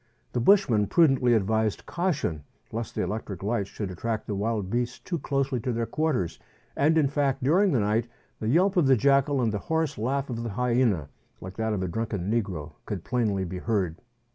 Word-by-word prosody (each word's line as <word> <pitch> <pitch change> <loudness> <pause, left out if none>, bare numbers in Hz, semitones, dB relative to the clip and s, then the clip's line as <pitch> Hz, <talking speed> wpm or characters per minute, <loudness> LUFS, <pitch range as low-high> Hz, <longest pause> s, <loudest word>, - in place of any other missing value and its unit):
The - - 0
bushman 120 - +4
prudently 135 - +4
advised 110 0 0
caution, 150 - -1 0.3
lest 115 0 -5
the - - 0
electric 100 -1 -4
lights 105 -1 -1
should 100 -3 -5
attract 110 +4 -3
the 105 - -3
wild 100 -1 -2
beasts 120 0 -1
too 170 -3 -4
closely 135 -2 -1
to 125 +3 -2
their 115 0 -1
quarters; 125 - -1 0.4
and 155 +3 +3
in 150 -3 +4
fact, 140 -2 0
during 180 +8 +4
the 125 - +2
night, 110 +3 +1 0.3
the 110 - -3
yelp 185 +8 +3
of 165 -6 +4
the 130 -1 +5
jackal 140 +1 +3
and 110 -2 +1
the 105 - -1
hoarse 160 -4 0
laugh 135 +5 -1
of 115 -1 -3
the 115 - -3
hyena, 115 - +1 0.3
like 95 0 -8
that 110 -1 0
of 95 -3 -1
a - - -1
drunken 105 0 -2
negro, 95 -10 -2 0.2
could 100 -6 -4
plainly 105 -6 0
be 90 +1 -5
heard. 95 -7 -1
115 Hz, 195 wpm, -27 LUFS, 100-140 Hz, 0.4 s, the